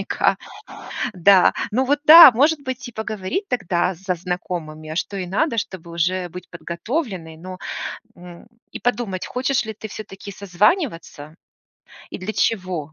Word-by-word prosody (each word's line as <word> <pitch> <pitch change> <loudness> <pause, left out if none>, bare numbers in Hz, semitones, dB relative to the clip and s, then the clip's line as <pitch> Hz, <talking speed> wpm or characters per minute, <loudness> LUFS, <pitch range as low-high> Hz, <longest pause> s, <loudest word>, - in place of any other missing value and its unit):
наверняка. - - +1 0.8
Да. 185 +1 +5 0.2
Ну, 250 +5 +1
вот 290 +3 +1
да, 315 -2 +11
может 290 +6 +2
быть 260 0 -5
и - - -11
поговорить 220 - -4
тогда 185 -5 0
со 180 +1 -3
знакомыми, 170 -3 -5
а 155 - -5
что 200 +3 -3
ей 185 -2 -4
надо, 230 - 0
чтобы 175 -5 -5
уже 180 +2 -1
быть 180 +2 -10
подготовленной, 175 - -4
ну, 185 +3 -9 0.6
м, 175 +3 -13 0.2
и - - -7
подумать, 235 -6 -2
хочешь 255 0 -1
ли 220 - -5
ты 220 - -6
всё-таки 200 -1 -9
созваниваться 185 - -1 0.8
и - - -6
для 205 +4 -5
чего. 180 -8 -1
190 Hz, 150 wpm, -21 LUFS, 175-240 Hz, 0.8 s, да